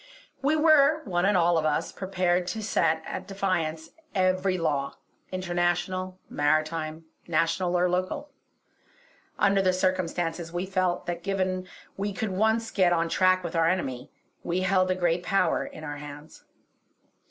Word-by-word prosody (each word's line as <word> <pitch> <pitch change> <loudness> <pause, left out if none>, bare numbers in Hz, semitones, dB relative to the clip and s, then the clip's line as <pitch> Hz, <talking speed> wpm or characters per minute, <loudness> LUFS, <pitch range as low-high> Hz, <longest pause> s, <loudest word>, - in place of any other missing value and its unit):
We 285 +3 +2
were, 310 -1 +5
one 175 -3 0
and 205 - +3
all 170 -1 +3
of - - -2
us, 155 -1 0
prepared 185 -2 0
to 220 +3 -3
set 160 -5 +1
at - - -6
defiance 170 -5 -2 0.2
every 185 0 +2
law 145 -5 -1 0.4
international, 185 0 -1
maritime, 155 +2 0 0.2
national 165 +2 +1
or 180 +1 +3
local. 185 +12 -2 1.1
Under 195 0 +3
the 185 -1 +2
circumstances 175 -2 -1
we 175 +2 -2
felt 185 -2 0
that, 175 -1 -3
given 185 -1 -1 0.3
we 200 +1 -2
could 205 +1 -3
once 220 +4 +1
get 185 -3 +3
on 165 -1 +1
track 185 +2 +3
with 170 -1 -5
our 165 0 +3
enemy, 135 -9 -2 0.3
we 175 +2 -1
held 185 0 +2
a 185 - +2
great 175 -1 +1
power 180 -2 +1
in 155 - -10
our 145 -1 -5
hands. 145 +1 -11
180 Hz, 150 wpm, -27 LUFS, 165-190 Hz, 1.1 s, were